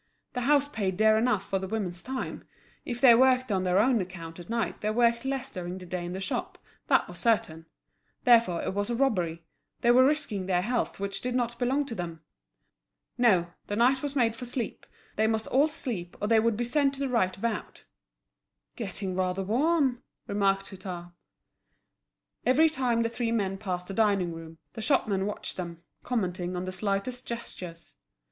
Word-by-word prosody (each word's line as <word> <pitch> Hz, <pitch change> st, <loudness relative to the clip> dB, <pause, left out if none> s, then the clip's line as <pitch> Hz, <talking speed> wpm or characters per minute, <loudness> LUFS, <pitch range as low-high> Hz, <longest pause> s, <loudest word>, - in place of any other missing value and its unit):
The 250 Hz, -, -2 dB
house 285 Hz, +2 st, +3 dB
paid 195 Hz, -9 st, -2 dB
dear 220 Hz, +1 st, +5 dB
enough 220 Hz, -3 st, +1 dB
for 195 Hz, -, 0 dB
the 190 Hz, -, -4 dB
women's 185 Hz, -4 st, -3 dB
time; 260 Hz, 0 st, -5 dB, 0.4 s
if 240 Hz, -1 st, -4 dB
they 245 Hz, -2 st, +8 dB
worked 255 Hz, 0 st, +4 dB
on 190 Hz, -2 st, +1 dB
their 185 Hz, 0 st, +2 dB
own 235 Hz, +1 st, +4 dB
account 175 Hz, -2 st, -8 dB
at 175 Hz, -, -11 dB
night 230 Hz, -1 st, -2 dB
they 210 Hz, -, 0 dB
worked 235 Hz, +2 st, +2 dB
less 270 Hz, 0 st, -2 dB
during 180 Hz, -2 st, -5 dB
the 185 Hz, -, -9 dB
day 180 Hz, 0 st, -4 dB
in 175 Hz, +1 st, -5 dB
the 190 Hz, -, -4 dB
shop, 190 Hz, -, -3 dB, 0.3 s
that -, -, +3 dB
was -, -, -8 dB
certain; 165 Hz, -9 st, +1 dB, 0.6 s
therefore 230 Hz, -9 st, +4 dB
it -, -, -2 dB
was 205 Hz, +2 st, -1 dB
a 240 Hz, -, 0 dB
robbery, 180 Hz, -11 st, 0 dB, 0.4 s
they 240 Hz, -, +5 dB
were 255 Hz, +2 st, +7 dB
risking 260 Hz, -10 st, 0 dB
their 180 Hz, -1 st, +2 dB
health 240 Hz, 0 st, -1 dB
which 200 Hz, 0 st, -3 dB
did 250 Hz, 0 st, -2 dB
not 240 Hz, -1 st, -1 dB
belong 265 Hz, +4 st, +1 dB
to 250 Hz, -, -6 dB
them. 170 Hz, -5 st, -5 dB, 1.0 s
No, 185 Hz, -8 st, +4 dB, 0.2 s
the 205 Hz, -, -2 dB
night 255 Hz, +4 st, +3 dB
was 290 Hz, -1 st, -3 dB
made 230 Hz, -4 st, +2 dB
for 245 Hz, -, -7 dB
sleep; 240 Hz, -2 st, -4 dB, 0.3 s
they 220 Hz, +1 st, +3 dB
must 220 Hz, 0 st, 0 dB
all 280 Hz, +4 st, +3 dB
sleep, 230 Hz, -, -5 dB
or 210 Hz, -, -1 dB
they 225 Hz, 0 st, +5 dB
would 225 Hz, -1 st, +1 dB
be 240 Hz, -, 0 dB
sent 275 Hz, +3 st, +1 dB
to -, -, -9 dB
the 280 Hz, -, 0 dB
right 205 Hz, -8 st, +1 dB
about! 225 Hz, +1 st, -4 dB, 0.9 s
"Getting 195 Hz, -3 st, -4 dB
rather 185 Hz, +1 st, 0 dB
warm!" 260 Hz, -, +2 dB, 0.2 s
remarked 195 Hz, -1 st, +1 dB
Hutin. 180 Hz, -3 st, -7 dB, 1.3 s
Every 305 Hz, +6 st, +5 dB
time 250 Hz, -5 st, +1 dB
the 230 Hz, -, 0 dB
three 230 Hz, 0 st, -2 dB
men 195 Hz, -4 st, -1 dB
passed 180 Hz, -3 st, -3 dB
the 195 Hz, -, -6 dB
dining 195 Hz, -5 st, +2 dB
room, 165 Hz, 0 st, -10 dB, 0.2 s
the 220 Hz, -, -6 dB
shopmen 215 Hz, -6 st, +1 dB
watched 210 Hz, -, -4 dB
them, 170 Hz, -2 st, -6 dB, 0.2 s
commenting 185 Hz, -6 st, -2 dB
on 180 Hz, +1 st, -3 dB
the 185 Hz, -, -3 dB
slightest 200 Hz, +6 st, -2 dB
gestures. 180 Hz, -7 st, -7 dB
215 Hz, 190 wpm, -28 LUFS, 185-245 Hz, 1.3 s, they